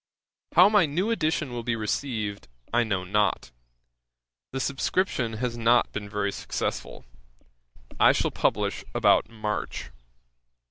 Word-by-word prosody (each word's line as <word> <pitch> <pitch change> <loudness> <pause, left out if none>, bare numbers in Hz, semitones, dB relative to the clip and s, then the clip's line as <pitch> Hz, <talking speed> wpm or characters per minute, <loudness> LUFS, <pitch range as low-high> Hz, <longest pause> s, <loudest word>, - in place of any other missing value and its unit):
'How 180 +3 +9
my 205 -5 +4
new 180 +10 -1
edition 160 - 0
will 120 -1 -4
be 115 0 -1
received 110 -2 -3 0.3
I 120 0 +4
know 100 -5 -1
not; 105 +3 0 1.0
the 135 - -3
subscription 135 - 0
has 120 +2 -2
not 120 +1 +3
been 100 0 -5
very 100 -1 -1
successful. - - -4 0.9
I - - +7
shall - - 0
publish - - 0
about - - +4
March. 105 - -4
120 Hz, 125 wpm, -26 LUFS, 105-145 Hz, 1.0 s, How